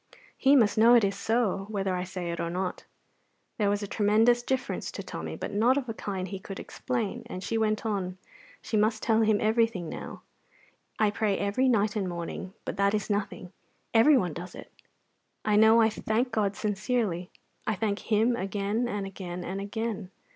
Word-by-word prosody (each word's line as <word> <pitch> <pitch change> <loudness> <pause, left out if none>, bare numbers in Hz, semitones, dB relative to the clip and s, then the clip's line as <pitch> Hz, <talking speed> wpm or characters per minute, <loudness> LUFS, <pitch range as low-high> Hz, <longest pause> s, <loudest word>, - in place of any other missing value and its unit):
He 275 +2 +4
must 215 -5 +4
know 235 +2 +7
it 235 - +5
is 200 0 +1
so, 200 -2 0
whether 195 -3 -1
I 180 0 -2
say 175 -1 -4
it 170 - -5
or 170 - -1
not." 180 +1 -3 0.7
There 205 -2 +3
was 205 +1 0
a - - -3
tremendous 220 +4 +3
difference 260 +1 -2
to - - -5
Tommy, - - -6
but - - -5
not 235 +6 +3
of 270 -3 -2
a 225 - -3
kind 190 -3 -4
he 195 0 -6
could 195 0 -8
explain, 240 -2 -3
and 185 -5 -6
she 230 - -2
went 215 0 0
on; 190 -4 -2 0.5
she - - -3
must 215 +1 +2
tell 225 -1 +3
him 215 -1 +4
everything 220 -6 +1
now. - - -8 0.7
"I 215 -1 +3
pray 210 -2 0
every 210 +6 +1
night 215 -3 +2
and 195 -4 -1
morning; 175 +2 -6
but - - -4
that 200 +1 +3
is 210 0 -2
nothing 195 -3 -3 0.4
everyone 225 - +5
does 175 +4 -8
it. - - -11 0.7
I 210 -1 +3
know 220 +2 +6
I 225 -1 +5
thank 230 +4 -1
God 205 -3 0
sincerely; 205 -3 -1 0.4
I 215 - +1
thank 205 0 -1
Him 225 +2 +2
again 205 +3 -1
and 205 -4 -3
again 180 -2 -6
and 190 +3 -4
again. 210 -1 -4
210 Hz, 190 wpm, -28 LUFS, 195-225 Hz, 0.7 s, know